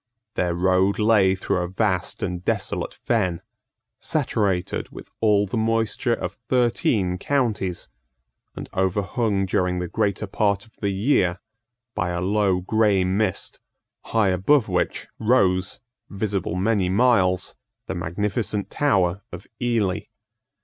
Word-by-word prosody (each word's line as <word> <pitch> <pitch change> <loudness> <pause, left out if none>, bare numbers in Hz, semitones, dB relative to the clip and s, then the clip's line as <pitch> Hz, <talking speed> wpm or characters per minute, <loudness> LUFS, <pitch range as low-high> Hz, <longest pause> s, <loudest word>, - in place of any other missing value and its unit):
Their 85 -1 0
road 95 +2 +2
lay 105 -3 +4
through 95 - -1
a 90 - -1
vast 95 0 -1
and 90 0 -3
desolate - - -2
fen, 95 -8 +1 0.6
saturated 95 -4 -1
with - - -12
all 105 -2 +3
the 100 +4 -3
moisture 115 +1 +1
of - - -6
thirteen 100 -6 +1
counties, 110 -9 -1 0.7
and - - -7
overhung 95 +2 0
during 90 -1 0
the 90 0 -2
greater 100 +2 -1
part 100 0 0
of 110 - -25
the 100 - -1
year 95 -4 +1 0.5
by 90 - -1
a 85 0 -2
low 95 -1 +1
grey 105 -1 +2
mist, 95 +1 -1 0.5
high 110 -4 +2
above 105 +8 +3
which 90 -2 -1
rose, 95 -6 +2 0.3
visible 100 -4 -2
many 95 -1 +1
miles, 95 -4 +3 0.3
the - - -4
magnificent 100 +4 -2
tower 95 - +1
of 90 +3 -8 0.2
Ely. 115 -6 0
100 Hz, 125 wpm, -23 LUFS, 90-110 Hz, 0.7 s, lay